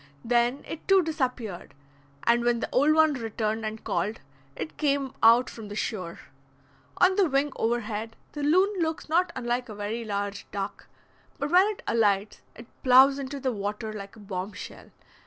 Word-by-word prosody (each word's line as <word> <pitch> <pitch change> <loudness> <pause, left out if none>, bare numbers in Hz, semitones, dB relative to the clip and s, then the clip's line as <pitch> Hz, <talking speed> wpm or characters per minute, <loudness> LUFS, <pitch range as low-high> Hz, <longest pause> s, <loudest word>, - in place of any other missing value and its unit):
Then 240 +3 +2
it 325 - -8
too 390 -1 +5
disappeared, 250 - -3 0.5
and 235 0 +3
when 240 -1 +2
the - - -3
old 290 +4 +4
one 315 -1 +5
returned 225 -2 -2
and 215 0 -5
called, 195 +6 -2 0.4
it 155 0 -6
came 280 -3 0
out 235 +3 +6
from 225 -2 -9
the 205 - -7
shore. 185 -6 -4 0.8
On 370 +1 +4
the 385 -5 +4
wing 275 +1 +1
overhead, 225 -1 -2 0.2
the 295 - -6
loon 370 +6 +3
looks 320 -1 -2
not 350 +3 +2
unlike 245 0 -2
a 215 - -7
very 210 +3 -3
large 200 -1 -4
duck, 200 0 -5 0.5
but 290 0 -3
when 370 +3 +6
it 425 -1 -5
alights 205 -2 +1
it 230 - -11 0.2
ploughs 265 +2 +6
into 275 +1 -5
the 260 -1 -1
water 210 +1 -4
like 200 -1 -8
a - - -14
bombshell. 195 0 -7
235 Hz, 170 wpm, -27 LUFS, 210-285 Hz, 0.8 s, out